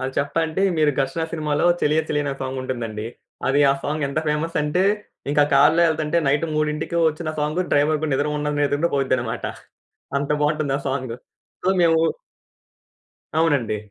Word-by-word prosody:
ఆ! - - -4
చెప్పంటే, 160 +5 0 0.2
మీరు 150 -1 +4
'ఘర్షణ' 160 +5 -2
సినిమాలో 155 0 0
చలియ 155 +2 +3
చలియ 145 -1 0
అనే 140 - -1
సాంగుంటుందండి. 120 -5 -4 0.4
అది 140 +2 +3
ఆ - - +4
సాంగ్ 150 +1 -1
ఎంత 140 - -2
ఫేమసంటే 150 +2 0 0.5
ఇంకా 145 0 +4
కారులో 155 +5 +5
ఎళ్తుంటే 155 +1 0
నైట్ 145 +4 +2
3కి 150 +2 -1
ఒచ్చిన 155 +1 -4
సాంగ్ 150 +4 0
డ్రైవర్ 150 +2 +3
గూడ 155 - -1
నిద్ర 145 +2 +1
ఉండదు, 150 0 -2
నిద్ర 145 0 +2
ఉన్న 170 - +2
పోయిద్దన్నమాట. 130 -4 -1 0.7
అంత 140 - -3
బాగుంటుంది 150 -2 +1
ఆ - - -7
సాంగ్. 130 -3 -3 0.5
సో 185 - 0
మేము 165 -1 +4 1.4
అవునండి. 140 -10 +2
150 Hz, 150 wpm, -22 LUFS, 140-155 Hz, 1.4 s, కారులో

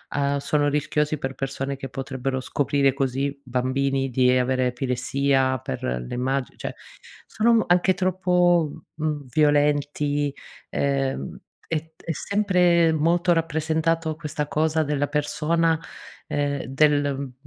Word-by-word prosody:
uhm, 140 0 +1
sono 145 +1 +1
rischiosi 150 +1 0
per 135 0 -4
persone 135 0 -3
che 135 0 -7
potrebbero 135 0 -3
scoprire 140 0 +1
così, 135 +1 -2
bambini 135 +2 0
di 125 +1 +3
avere 130 0 +1
epilessia 130 +1 0
per 65 - -6
le 60 0 -3
immagi 130 +1 -2
cioè - - -5 0.5
sono 225 +1 +2
anche 180 +1 +3
troppo, 180 -3 +1
mhmm, 150 -2 -2
violenti, 145 0 +2 0.4
ehm, 135 - -1 0.3
è 165 - 0 0.2
t - - -21
è 165 - -3
sempre 180 -4 +3
molto 170 +3 +2
rappresentato 160 0 0
questa 150 -2 -4
cosa 160 +1 +1
della 145 -1 0
persona, 160 +2 +1 0.5
ehm, 145 -1 -1
del, 145 +1 +2
mhmm, 135 -2 -6
145 Hz, 125 wpm, -24 LUFS, 135-160 Hz, 0.5 s, di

